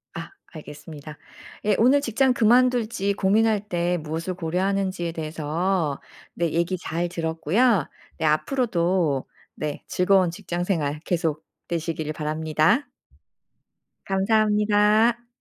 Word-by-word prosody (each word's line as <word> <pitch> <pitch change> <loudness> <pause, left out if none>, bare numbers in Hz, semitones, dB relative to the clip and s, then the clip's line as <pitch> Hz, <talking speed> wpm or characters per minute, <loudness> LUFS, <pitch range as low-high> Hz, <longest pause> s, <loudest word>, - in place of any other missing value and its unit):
아. - - -6 0.2
알겠습니다. 150 -1 -10 0.5
예. 210 -1 +3
오늘 260 +5 +5
직장 260 0 +2
그만둘지 235 -3 +2
고민할 210 +2 +2
때 175 0 0
무엇을 165 +4 -3
고려하는지에 185 0 -1
대해서 160 0 -2 0.3
네 170 -2 -1
얘기 170 +3 0
잘 175 0 -3
들었고요. 170 - +1 0.3
네 160 - -2
앞으로도 170 - +1 0.3
네 150 -1 -4
즐거운 185 -1 +3
직장생활 175 -5 -2
계속 160 -3 -1 0.3
되시기를 160 -2 -3
바랍니다. 155 - +1 1.2
감사합니다. 210 +3 +2
180 Hz, 260 characters per minute, -24 LUFS, 160-210 Hz, 1.2 s, 오늘